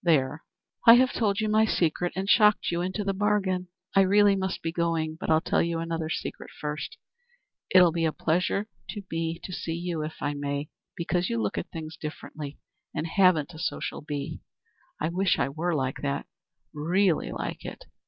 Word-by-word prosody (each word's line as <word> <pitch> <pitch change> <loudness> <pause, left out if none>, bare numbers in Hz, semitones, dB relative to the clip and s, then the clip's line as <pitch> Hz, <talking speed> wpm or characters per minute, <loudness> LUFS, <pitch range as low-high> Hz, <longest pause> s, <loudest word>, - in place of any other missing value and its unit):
There! 150 -3 +2 0.4
I 230 - +12
have 255 +1 +4
told 205 -2 +1
you 215 - +1
my 215 +1 +4
secret 175 -4 +1
and 190 +1 -2
shocked 210 -2 +5
you 170 0 0
into 185 +4 -2
the 195 0 0
bargain. 190 -2 +1 0.3
I 195 - +7
really 200 +1 +5
must 190 -1 -2
be 165 - -1
going. 165 -2 0
But - - -4
I'll 160 0 +5
tell - - +1
you 170 0 0
another 165 -1 -2
secret - - -4
first: 150 - -4 0.7
It'll 180 -2 +7
be 165 0 0
a 160 - +2
pleasure 180 +7 0 0.2
to 205 -2 -5
me 165 0 -2
to 185 - -6
see 165 -1 -3
you, 170 -2 -3
if 155 +1 -5
I 145 - -1
may, 145 0 -3 0.3
because 175 +1 0
you 115 - 0
look 105 -2 -1
at - - -4
things 160 -1 -7
differently 150 -1 -7 0.4
and 155 - -1
haven't 175 -3 +3
a 160 - -10
social 175 - -3
bee. 145 -2 -5 0.6
I 155 - 0
wish 185 +2 +2
I 120 - +1
were 165 +4 -1
like 130 -2 -1
that 140 -1 -2 0.5
really 170 +3 +1
like - - -5
it. - - -8
170 Hz, 190 wpm, -27 LUFS, 155-190 Hz, 0.7 s, I